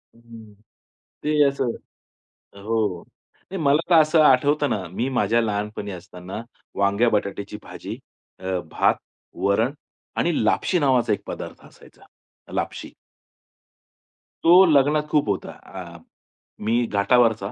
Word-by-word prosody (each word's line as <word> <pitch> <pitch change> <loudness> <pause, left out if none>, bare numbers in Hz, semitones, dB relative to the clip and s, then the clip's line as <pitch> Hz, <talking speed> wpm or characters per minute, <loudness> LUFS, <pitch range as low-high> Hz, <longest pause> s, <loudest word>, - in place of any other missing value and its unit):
हं, 115 -2 -14 0.7
ते 150 0 +2
असं 135 -3 -1 0.9
हो. 105 -6 -1 0.5
नाही 190 -3 -4
मला 145 +2 +4
तर - - +7
असं 155 +1 +3
आठवतं 145 +2 +4
ना, 95 -3 -2
मी 105 +9 -3
माझ्या 120 -2 +2
लहानपणी 105 -1 -3
असताना 90 +2 -8 0.3
वांग्या-बटाट्याची 100 0 0
भाजी, - - -8 0.4
अ, 95 0 -2
भात, - - +3 0.5
वरण 110 +7 +2 0.4
आणि 170 -8 +1
लापशी 180 +10 +2
नावाचा 130 -5 +2
एक - - -4
पदार्थ - - -7
असायचा. - - -19 0.5
लापशी. - - -4 1.5
तो 180 +3 +8
लग्नात 150 -1 +3
खूप 150 -5 +2
होता. 100 - -2
आ, 85 -3 -11 0.6
मी 115 +3 +1
घाटावरचा. 110 -1 +2
115 Hz, 115 wpm, -23 LUFS, 100-145 Hz, 1.5 s, तो